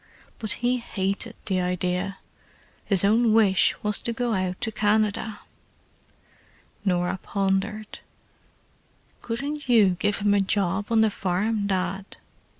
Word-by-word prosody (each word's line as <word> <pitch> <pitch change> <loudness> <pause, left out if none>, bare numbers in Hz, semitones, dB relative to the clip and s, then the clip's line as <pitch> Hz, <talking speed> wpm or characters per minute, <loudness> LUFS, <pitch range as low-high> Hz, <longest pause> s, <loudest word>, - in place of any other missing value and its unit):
But 215 -2 -1
he 250 +1 +3
hated 200 -4 -2
the 185 -2 0
idea. 180 +2 -2 0.7
His 195 -3 +4
own 220 +2 +3
wish 205 -4 +4
was 210 -1 +2
to 235 - -1
go 235 0 -1
out 185 -2 -2
to 220 - -1
Canada." 215 0 0 1.4
Norah 180 -1 0
pondered. 200 +2 -2 1.2
"Couldn't 275 +4 -4
you 215 -6 +5
give 205 +2 +1
him 205 0 +2
a 205 - +3
job 195 0 0
on 225 -1 +3
the 220 -1 +3
farm, 200 +3 -1
Dad?" 190 0 -3
205 Hz, 125 wpm, -25 LUFS, 190-220 Hz, 1.4 s, you